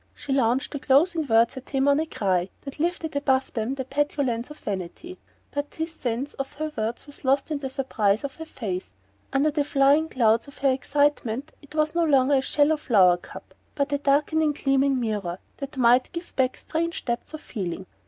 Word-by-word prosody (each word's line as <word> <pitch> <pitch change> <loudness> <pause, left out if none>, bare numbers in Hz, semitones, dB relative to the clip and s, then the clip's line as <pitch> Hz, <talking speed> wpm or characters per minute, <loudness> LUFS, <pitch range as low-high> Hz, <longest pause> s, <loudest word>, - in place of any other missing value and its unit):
She 285 -2 -4
launched 255 0 +1
the 285 - -4
closing 310 +4 +3
words 230 +2 +3
at 260 - -9
him 270 0 +1
on 285 +1 +4
a 320 - -1
cry 185 - 0
that 275 +1 -9
lifted 335 -1 -1
them 285 - -2
above 265 -2 +1
the 260 +3 -2
petulance 270 -4 -1
of 300 - -10
vanity; 205 - -6 0.3
but 285 0 -4
his 320 +1 -3
sense 255 +1 -3
of 275 0 -5
her 310 +1 -4
words 220 +2 -3
was 290 0 -13
lost 275 +3 +1
in 295 - -1
the 270 -2 -4
surprise 225 -6 0
of 280 -1 -5
her 320 - -7
face. 190 - -5 0.4
Under 285 +3 +2
the 295 0 +1
flying 285 +3 +3
clouds 230 0 +2
of 280 - -13
her 275 -1 +3
excitement 280 0 0
it 290 +1 -14
was 310 0 +1
no 340 0 +2
longer 280 -2 +4
a - - +2
shallow 295 +3 +2
flower 190 - +4
cup - - -12 0.2
but 285 0 0
a 285 - +1
darkening 295 +2 +2
gleaming 275 -1 +2
mirror 205 -7 -2 0.2
that 275 -1 -7
might 250 0 +4
give 340 0 -7
back 260 -1 +1
strange 335 +1 -3
depths 240 +5 -3
of 310 - -9
feeling. 190 -4 -5
275 Hz, 200 wpm, -25 LUFS, 240-295 Hz, 0.4 s, on